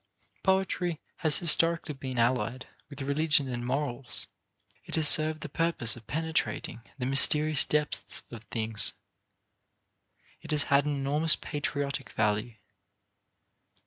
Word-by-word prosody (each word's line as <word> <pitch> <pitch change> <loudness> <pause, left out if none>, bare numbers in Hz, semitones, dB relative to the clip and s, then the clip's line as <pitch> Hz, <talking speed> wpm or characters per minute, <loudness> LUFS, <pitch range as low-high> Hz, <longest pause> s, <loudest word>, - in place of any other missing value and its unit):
Poetry 185 -3 0 0.2
has 155 -4 +5
historically 165 -1 +2
been 130 -2 -7
allied 120 +1 0 0.2
with 140 -1 -8
religion 145 0 +1
and 120 -1 -4
morals; 130 -1 -4 0.6
it - - -4
has 155 -2 +7
served 155 +1 +5
the - - -6
purpose 150 -6 0
of 115 -3 -15
penetrating 160 -5 -3 0.2
the 125 - -4
mysterious 150 +2 +3
depths 150 0 -2
of 115 -2 -10
things. 110 -3 +2 1.5
It - - -13
has 150 -1 +3
had 140 +1 +3
an 145 - -1
enormous 145 +4 +2
patriotic 145 -1 -4
value. 105 +2 -1
140 Hz, 120 wpm, -28 LUFS, 125-155 Hz, 1.5 s, has